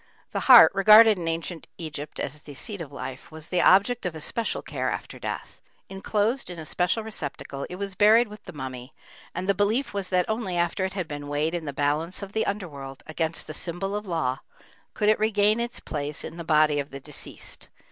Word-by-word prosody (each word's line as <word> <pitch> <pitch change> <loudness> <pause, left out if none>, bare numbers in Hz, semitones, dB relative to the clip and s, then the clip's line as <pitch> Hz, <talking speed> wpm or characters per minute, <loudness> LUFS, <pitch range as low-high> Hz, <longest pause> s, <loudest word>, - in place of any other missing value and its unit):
The - - -1
heart, 240 -11 +9
regarded 215 +1 +7
in 170 - -4
ancient 165 0 -3
Egypt 155 -3 -6
as 150 - -4
the 145 -2 -11
seat 200 - -6
of 150 -4 -7
life, 130 -2 -7
was 160 0 -10
the 180 -1 +2
object 205 +8 +4
of 180 -3 -3
especial 225 +9 -2
care - - -2
after - - -5
death. - - -6 0.3
Enclosed 210 +4 -1
in 175 - -7
a 160 - -7
special 180 +7 0
receptacle 145 -9 -5
it 180 - -6
was 195 +1 -4
buried 220 +5 +5
with 210 0 -12
the - - -8
mummy, 130 -3 -7 0.4
and 180 +2 -3
the 200 - +4
belief 210 +7 0
was 200 -2 -3
that 180 -1 +2
only 220 -5 -2
after 175 +2 0
it 190 - -4
had 185 -4 -3
been 145 -2 -6
weighed 150 +3 0
in 170 -2 -3
the 145 - -3
balance 150 +7 -1
of 200 0 -8
the 220 - 0
underworld, 140 -10 -5
against 160 +1 -2
the 155 - -7
symbol 185 +5 -4
of 210 0 -4
law, 155 -7 -1 0.6
could 210 - 0
it 215 - +4
regain 215 0 +3
its 235 0 -3
place 145 -1 -3
in 165 - -7
the 170 - -5
body 155 -2 +3
of 140 0 -3
the 135 - -8
deceased. 145 +1 -7
175 Hz, 210 wpm, -26 LUFS, 150-205 Hz, 0.6 s, heart